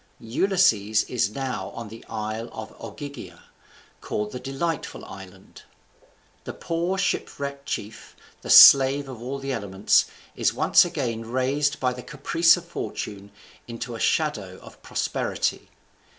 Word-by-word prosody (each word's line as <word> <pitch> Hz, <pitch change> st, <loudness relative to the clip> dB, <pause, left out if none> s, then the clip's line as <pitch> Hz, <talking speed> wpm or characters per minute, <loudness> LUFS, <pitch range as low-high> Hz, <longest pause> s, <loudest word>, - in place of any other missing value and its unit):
Ulysses 115 Hz, -, +2 dB
is 120 Hz, -5 st, -1 dB
now 130 Hz, -5 st, -4 dB
in 115 Hz, -3 st, -7 dB
the 115 Hz, +2 st, -11 dB
isle 110 Hz, +2 st, -4 dB, 0.3 s
Ogygia, 140 Hz, +6 st, -9 dB, 0.6 s
called 105 Hz, 0 st, -3 dB
the 125 Hz, -, -6 dB
Delightful 140 Hz, +5 st, -4 dB
Island. 95 Hz, 0 st, -13 dB, 0.8 s
The -, -, -6 dB
poor 170 Hz, +3 st, -2 dB
shipwrecked 140 Hz, -6 st, -3 dB
chief, 105 Hz, +1 st, -6 dB, 0.3 s
the -, -, -9 dB
slave 140 Hz, +1 st, +8 dB
of 125 Hz, -4 st, -9 dB
all 130 Hz, +3 st, -4 dB
the 135 Hz, 0 st, -4 dB
elements, 100 Hz, -3 st, +2 dB, 0.3 s
is -, -, 0 dB
once -, -, +5 dB
again 115 Hz, -1 st, -4 dB
raised 135 Hz, +4 st, 0 dB
by 125 Hz, -1 st, 0 dB
the 125 Hz, -, -8 dB
caprice 165 Hz, +5 st, +3 dB
of 175 Hz, -, -9 dB
fortune 100 Hz, -11 st, -6 dB, 0.4 s
into 120 Hz, +1 st, -6 dB
a 115 Hz, -, -7 dB
shadow 105 Hz, -, -1 dB
of -, -, -15 dB
prosperity. -, -, -2 dB
125 Hz, 130 wpm, -24 LUFS, 110-145 Hz, 0.8 s, slave